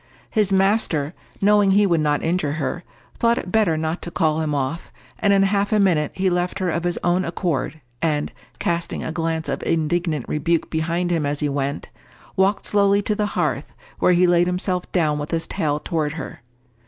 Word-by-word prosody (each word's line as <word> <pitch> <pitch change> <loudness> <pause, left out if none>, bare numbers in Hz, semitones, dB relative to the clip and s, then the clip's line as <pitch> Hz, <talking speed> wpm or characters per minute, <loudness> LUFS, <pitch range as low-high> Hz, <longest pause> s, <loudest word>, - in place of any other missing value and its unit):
His 210 -3 +2
master, 190 -6 +2 0.3
knowing 205 0 +4
he 205 +2 +5
would 170 -4 +2
not 150 -1 +1
injure 165 -3 0
her, 160 +3 -3 0.4
thought 235 0 +3
it 185 - -4
better 205 -8 +3
not 160 +2 -2
to - - -4
call 160 -2 +1
him 150 -2 -1
off, 140 +4 -3 0.3
and 205 - +3
in 195 -1 +5
half 200 +1 +1
a 215 - +3
minute 165 -7 +2
he 190 0 0
left 180 0 0
her 185 -2 0
of 170 +2 -2
his 175 - 0
own 175 +1 +2
accord, 165 -4 -2 0.2
and, 150 -2 0 0.2
casting 170 0 -2
a - - -3
glance 165 -1 -2
of - - -2
indignant 165 -3 0
rebuke 165 +2 0
behind 170 +2 -1
him 165 -3 +1
as 145 0 -1
he 150 - 0
went, 140 +1 -3 0.4
walked 195 +2 +2
slowly 200 0 +3
to 210 - 0
the 210 0 0
hearth, - - -1 0.3
where 180 - +4
he 180 +1 +4
laid 175 0 +4
himself 180 0 -2
down 155 -5 +1
with 145 - -4
his 165 -1 -1
tail 150 -6 -1
toward 155 -2 -2
her. 155 -5 -7
170 Hz, 195 wpm, -22 LUFS, 155-190 Hz, 0.4 s, he